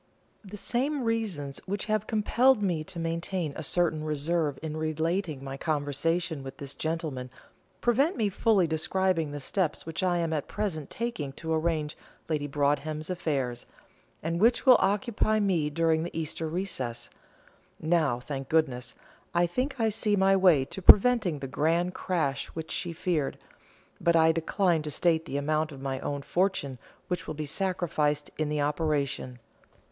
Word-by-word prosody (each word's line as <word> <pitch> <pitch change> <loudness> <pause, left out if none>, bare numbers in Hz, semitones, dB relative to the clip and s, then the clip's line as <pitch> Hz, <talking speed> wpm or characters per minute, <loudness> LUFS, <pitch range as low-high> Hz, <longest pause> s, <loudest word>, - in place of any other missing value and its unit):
The 205 +1 -9
same 265 +6 -1
reasons 205 -12 -2
which 200 +2 -2
have 215 -1 0
compelled 230 +2 +3
me 170 -5 0
to - - -8
maintain 165 -1 -2
a - - -5
certain 160 0 +1
reserve 155 -1 0
in 155 -1 -4
relating 160 0 -1
my 135 0 -6
conversation 155 +2 -1
with 135 0 -8
this 140 -2 -6
gentleman 155 -6 -3 0.5
prevent 270 +8 +2
me 220 -3 +2
fully 200 -1 +3
describing 165 +1 0
the 145 0 -5
steps 165 +2 -1
which 165 +2 -3
I 180 -2 +2
am 165 -1 0
at 150 -3 -2
present 160 -9 -3
taking 220 - -4
to 160 +3 -3
arrange 155 -2 0 0.3
Lady 150 -2 -1
Broadhem's 145 +3 -1
affairs, 140 -9 -2 0.6
and 165 +2 -1
which 235 +2 +4
will 255 -3 +9
occupy 215 +1 +1
me 180 -7 +1
during 160 +1 +2
the 165 0 -4
Easter 160 +1 -2
recess. 130 -10 -3 0.7
Now, 155 -6 +1
thank 135 +1 -6
goodness, 130 -7 0 0.4
I 175 0 +4
think 255 +10 -2
I 225 -1 +3
see 210 0 +1
my 195 0 +4
way 180 -8 +5
to 190 - -8
preventing 205 -5 +6
the 135 - -3
grand 165 +6 +1
crash 155 -9 -1
which 160 -1 -5
she 175 - -2
feared, 165 -3 -1 0.6
but 170 0 +3
I 160 0 +6
decline 165 +1 +1
to 150 - -5
state 165 +1 +1
the 140 - -3
amount 155 +2 0
of 140 - -9
my 135 -1 -3
own 140 0 -3
fortune 145 -6 0 0.3
which 180 -1 -3
will 155 - -4
be 155 +1 -4
sacrificed 155 -4 -1
in 155 -1 0
the 150 -1 0
operation. 145 -4 -1
160 Hz, 160 wpm, -28 LUFS, 145-190 Hz, 0.7 s, will